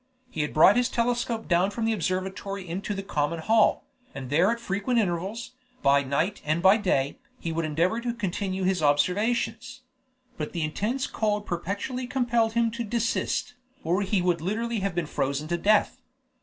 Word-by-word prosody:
He 155 - -2
had 150 - -2
brought 190 +8 +6
his 245 -1 +2
telescope 235 -1 -1
down 175 +2 +3
from 225 +2 -3
the 225 - +2
observatory 190 0 -3
into 195 +4 -3
the 195 - -4
common 150 -3 -1
hall, 220 +7 +3 0.3
and 135 -1 -7
there 170 +7 +4
at 235 - -2
frequent 205 +2 -1
intervals, 195 +4 -2 0.3
by 140 0 +5
night 140 +8 -1
and 155 +2 0
by 190 +3 +7
day, 140 -9 0 0.2
he 165 - -3
would 165 0 -1
endeavor 170 +9 0
to 240 0 -3
continue 190 -2 -2
his 185 -2 +1
observations; 220 - 0 0.6
but 150 - -4
the 170 - -1
intense 215 - -1
cold 210 -1 -1
perpetually 200 +9 -3
compelled 240 -3 +1
him 230 -1 +2
to 235 +2 -4
desist, 235 +2 -1 0.3
or 175 +5 +1
he 195 -2 0
would 175 -3 +1
literally 225 +5 -2
have 195 -2 -2
been 175 -2 0
frozen 140 +1 -2
to 175 - 0
death. 210 +4 +2
195 Hz, 175 wpm, -26 LUFS, 170-230 Hz, 0.6 s, by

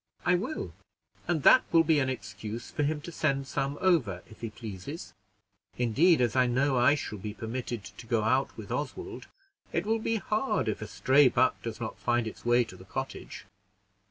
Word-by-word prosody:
"I 175 - +4
will, 205 - -2 0.5
and 160 -5 0
that - - +8
will 165 -1 +6
be 160 -2 +3
an 130 -1 +1
excuse 105 -1 -6
for - - -2
him 150 +1 0
to 170 - -8
send 140 -4 0
some 140 +1 -2
over, 135 - +2
if 110 - -16
he 115 - -3
pleases. 105 - -8 0.6
Indeed, 130 +7 +4
as 120 0 +1
I 130 -1 +4
know 130 +3 +2
I 125 +4 +5
shall 105 -7 -5
be 105 +2 -6
permitted 115 -1 -4
to 100 +4 -11
go 110 -2 +1
out 130 +5 +1
with 110 -1 -8
Oswald, 365 - -4 0.4
it 170 - -1
will 225 +1 +1
be 225 +1 0
hard 215 - 0
if 110 - -2
a 110 - -4
stray 135 +1 +4
buck - - +2
does - - -5
not - - -5
find 120 -1 +1
its 110 - -7
way 120 +1 +4
to 110 -5 -11
the 95 - -13
cottage." 135 +7 -6
130 Hz, 195 wpm, -29 LUFS, 110-155 Hz, 0.6 s, that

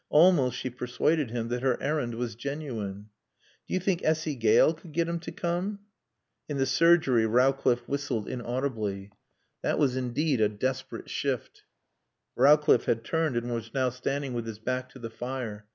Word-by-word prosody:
Almost 150 -6 +5
she 130 - -4
persuaded 125 +3 0
him 115 0 -3
that 120 0 -2
her 130 -1 +1
errand 140 -5 -1
was 120 0 -3
genuine. 115 -6 -5 0.6
"Do - - -2
you - - +2
think 185 -1 0
Essy 155 0 +1
Gale 115 +5 +4
could 165 -1 -14
get 170 +1 +1
him 170 0 -2
to 165 - -7
come?" 180 +4 -2 0.7
In 145 - -2
the 135 - +2
surgery 135 -4 +4
Rowcliffe 125 0 +2
whistled 135 -6 -2
inaudibly. 115 -6 -3 0.5
That - - 0
was 135 -4 +2
indeed 130 +1 0
a 105 - +4
desperate 130 +5 -3
shift. - - -3 0.7
Rowcliffe 150 +4 +5
had 115 0 0
turned 160 -1 0
and 120 0 -2
was 115 0 -5
now 130 -2 +2
standing 135 +2 -3
with 120 -1 -3
his 110 -2 -6
back 130 +3 -3
to 130 - -14
the 115 -3 -7
fire. 115 -3 -5
130 Hz, 170 wpm, -28 LUFS, 115-150 Hz, 0.7 s, Almost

